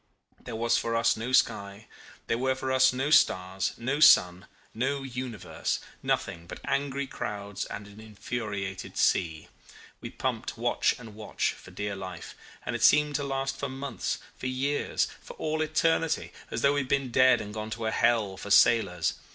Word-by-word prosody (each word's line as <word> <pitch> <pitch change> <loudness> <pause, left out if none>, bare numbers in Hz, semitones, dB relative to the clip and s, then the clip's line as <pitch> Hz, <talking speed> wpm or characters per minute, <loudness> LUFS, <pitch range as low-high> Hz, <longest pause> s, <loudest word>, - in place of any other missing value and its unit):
There 120 - -6
was 115 +1 +2
for 115 0 -2
us 115 - +3
no 115 +3 -4
sky, 100 -4 +1 0.4
there 115 - -1
were 130 +1 +1
for 130 0 -3
us 130 0 +5
no 135 +3 -2
stars, 95 -9 +3
no 130 +5 -2
sun, 90 -11 +6 0.3
no 135 +4 -1
universe 125 -4 -4 0.2
nothing 85 0 -2
but - - -8
angry 140 0 -1
clouds 100 -5 -5
and 105 - -7
an 105 +1 -14
infuriated 100 -3 -5
sea. 80 -3 +1 0.5
We - - -7
pumped - - -3
watch - - +1
and 115 -3 -11
watch, 105 0 -2
for - - -14
dear 105 -1 -4
life; 95 -3 -8 0.3
and - - -2
it - - -4
seemed 150 0 +5
to 145 - -3
last 135 -1 -2
for 140 - -2
months, 135 -1 -3 0.2
for - - -5
years, 135 +3 0
for - - -10
all 155 0 -2
eternity, 160 +1 +1 0.2
as 115 - -3
though 140 0 +5
we 145 - +1
had 135 - -3
been 135 -3 0
dead 130 0 +5
and 105 0 -7
gone 110 0 -5
to 110 0 -4
a 110 - 0
hell 110 -6 +2
for 100 - -8
sailors. 100 -6 +4
115 Hz, 175 wpm, -28 LUFS, 100-135 Hz, 0.5 s, sun